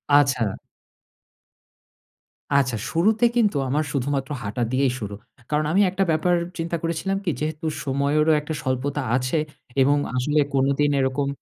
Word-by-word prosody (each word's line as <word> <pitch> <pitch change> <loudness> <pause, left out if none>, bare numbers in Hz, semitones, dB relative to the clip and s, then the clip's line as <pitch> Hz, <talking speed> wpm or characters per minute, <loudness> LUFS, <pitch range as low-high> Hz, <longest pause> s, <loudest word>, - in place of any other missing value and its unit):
আচ্ছা। 130 -8 +3 2.0
আচ্ছা, 130 -3 +2 0.2
শুরুতে 215 +8 +3
কিন্তু 210 -10 +3
আমার 150 +4 +1
শুধুমাত্র 140 0 -1
হাঁটা 105 +4 -2
দিয়েই 130 0 +2
শুরু। 100 -2 -5 0.3
কারণ 150 0 +1
আমি 195 +4 +4
একটা 190 +1 0
ব্যাপার 175 +3 +2 0.2
চিন্তা 165 +1 -2
করেছিলাম 170 +4 -1
কি? 175 - 0
যেহেতু 155 +1 -3 0.2
সময়েরও 145 +3 +2
একটা 155 +1 -5
স্বল্পতা 135 +2 -1
আছে 130 +5 0 0.4
এবং 145 +2 +4 0.2
আসলে 150 +4 +1
কোনদিন 140 +2 +2
এরকম 130 +1 0
145 Hz, 130 wpm, -23 LUFS, 130-160 Hz, 2.0 s, আমি